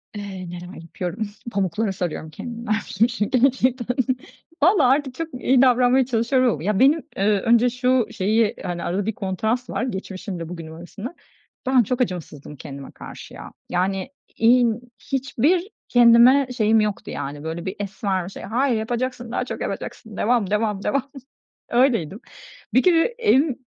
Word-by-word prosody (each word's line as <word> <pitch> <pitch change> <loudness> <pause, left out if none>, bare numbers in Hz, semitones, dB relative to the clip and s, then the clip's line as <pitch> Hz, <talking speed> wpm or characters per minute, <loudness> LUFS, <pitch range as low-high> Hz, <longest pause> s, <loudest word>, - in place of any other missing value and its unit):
Eee, 190 -3 -6
neler 175 +1 -8
yapıyorum. 180 +5 -4 0.2
"Pamuklara 200 +1 0
sarıyorum 175 -4 -4
kendimi." 235 +9 -8
dermişim 215 +1 +1
şi 220 -3 -2
gerçekten. 255 -1 +2 0.7
Vallaha 325 -8 +5
artık 270 -1 +1
çok 330 +3 -3
iyi 255 0 +3
davranmaya 250 0 +4
çalışıyorum 250 +1 +2
ama. 155 - -6
Ya, 205 0 0
benim, 290 +4 +4
eee, 195 - 0 0.2
önce 235 +4 +4
şu 250 0 +1
şeyi, 215 +3 +1
hani, 175 -1 -4
arada 190 +3 -1
bir 220 - -1
kontrast 220 +6 -2
var - - -2
geçmişimle 190 -6 -5
bugünüm 165 -2 -8
arasında. 200 - -8 0.5
Ben 260 -2 +5
çok 250 +4 -2
acımasızdım 160 - -4
kendime 140 0 -9
karşı - - -11
ya. - - -10 0.2
Yani, 190 +5 -1 0.3
iii, 240 +1 +5
n 220 - -8 0.3
hiçbir 280 - +1 0.2
kendime 245 +3 +6
şeyim 220 -1 +4
yoktu 210 -1 -3
yani, 145 +1 -5
böyle, 165 +2 -5
bir 190 - -4
es 200 0 -7
ver, 190 -3 0
bir - - -7
şey. - - -10
"Hayır 245 +2 +1
yapacaksın 240 +1 -3
daha - - -1
çok - - -6
yapacaksın, 220 -3 -6
devam, 225 -3 +1
devam, 210 -1 0
devam." 275 0 -1 0.6
öyleydim. 230 - +2 0.5
Bir 255 - +4
kere 335 -3 +4
en 420 - +2
225 Hz, 155 wpm, -22 LUFS, 190-255 Hz, 0.7 s, kendime